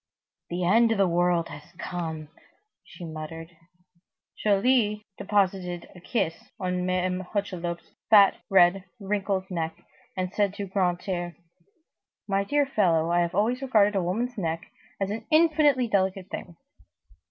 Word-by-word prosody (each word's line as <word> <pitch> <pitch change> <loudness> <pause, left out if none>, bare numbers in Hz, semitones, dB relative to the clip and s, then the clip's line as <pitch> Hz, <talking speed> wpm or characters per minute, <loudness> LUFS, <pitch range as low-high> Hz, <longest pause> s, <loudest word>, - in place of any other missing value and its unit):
"The 175 +1 -2
end 225 +6 +4
of 225 - +1
the 195 -1 +4
world 175 -1 +1
has 150 +4 -11
come," 160 -5 -5 0.5
she 175 - -10
muttered. 165 +1 -8 0.9
Joly 210 0 +2
deposited 185 -3 -1
a - - -11
kiss 165 -5 -2
on 180 -1 -1
Mame 185 0 0
Hucheloup's 180 -3 -4 0.2
fat, 200 -3 +7
red, 185 0 +4
wrinkled 195 -1 -2
neck, 165 0 -4 0.3
and 185 +1 -2
said 200 -2 +1
to 200 - -4
Grantaire: 180 -2 -1 0.9
"My 200 -1 +1
dear 290 +7 +2
fellow, 170 -10 +2
I 175 - +3
have 170 0 0
always 240 +5 +1
regarded 215 -6 +3
a 195 - +2
woman's 225 +7 -2
neck 165 -2 -3 0.3
as 195 0 -1
an 220 +1 -5
infinitely 305 -5 +4
delicate 190 -2 0
thing." 175 - -7
190 Hz, 135 wpm, -26 LUFS, 175-210 Hz, 0.9 s, fat